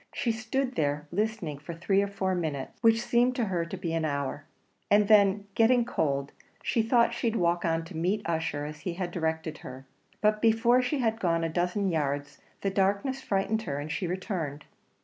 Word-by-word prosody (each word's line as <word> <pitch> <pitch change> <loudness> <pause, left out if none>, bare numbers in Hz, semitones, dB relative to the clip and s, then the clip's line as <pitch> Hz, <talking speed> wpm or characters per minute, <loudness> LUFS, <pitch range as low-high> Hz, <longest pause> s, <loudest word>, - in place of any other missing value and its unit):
She 245 -4 +1
stood 245 +4 -2
there, 145 -3 -1
listening 185 -7 -2
for 160 +3 -7
three 195 +4 +2
or 200 - 0
four 195 -1 -1
minutes, 155 -7 -2
which 225 0 +4
seemed 245 +1 +2
to 240 - 0
her 175 -4 -1
to 180 +3 -6
be 170 -3 -3
an 165 -1 0
hour, 140 -1 -2 0.4
and 205 0 +5
then 200 -1 +5
getting 235 +2 +4
cold, 140 - -1 0.3
she 230 - +1
thought 235 +1 +3
she'd 235 -1 -1
walk 175 -3 +1
on 165 0 0
to 165 - -10
meet 185 +5 -1
Ussher 160 -3 -1
as 150 0 -7
he 175 +2 -4
had 180 -1 -3
directed 160 -2 -2
her; 130 +1 -9 0.3
but 215 0 +2
before 230 +2 +4
she 255 +4 -1
had 225 -3 0
gone 165 -3 +1
a 165 - 0
dozen 180 +4 0
yards 145 -4 -2 0.2
the 195 - 0
darkness 200 +8 0
frightened 215 0 0
her, 140 -8 -4
and 145 +2 -5
she 180 - -2
returned. 170 -5 -4
185 Hz, 195 wpm, -28 LUFS, 160-220 Hz, 0.4 s, and